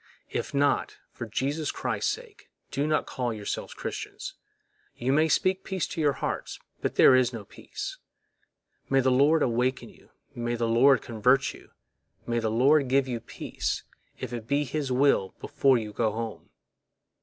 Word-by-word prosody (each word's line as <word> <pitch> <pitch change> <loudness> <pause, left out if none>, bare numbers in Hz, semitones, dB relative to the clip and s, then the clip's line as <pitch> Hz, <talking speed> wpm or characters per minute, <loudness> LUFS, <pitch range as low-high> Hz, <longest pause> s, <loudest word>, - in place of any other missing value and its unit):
If - - -3
not, 140 0 +1
for 120 - -7
Jesus 140 +7 -1
Christ's - - -1
sake, 445 -1 -9 0.2
do 145 +2 0
not 155 - +1
call 125 -2 -2
yourselves 105 -2 -5
Christians; - - -6 0.6
you 130 +3 0
may 155 +2 +4
speak 185 +4 +1
peace 190 -3 -2
to 165 - -3
your 145 -2 +3
hearts, - - -4 0.2
but - - -2
there 130 - +7
is 125 -1 +3
no 115 -4 -7
peace. - - -7 0.9
May 135 - +4
the 130 0 +3
Lord 145 +5 +4
awaken 125 +2 0
you, - - -20 0.2
may 120 0 -2
the 115 0 0
Lord 130 +4 +5
convert 125 +4 +2
you, - - -15 0.6
may 120 0 0
the 110 -1 0
Lord 135 +5 +4
give 135 +1 +2
you 120 -2 -2
peace, 115 - -4 0.3
if 120 - -6
it 115 -2 -5
be 140 +3 +2
His 145 0 -3
will, 125 -7 +2
before 135 -2 +3
you 105 -2 -5
go 110 -1 +1
home! 115 0 -6
130 Hz, 165 wpm, -27 LUFS, 115-145 Hz, 0.9 s, there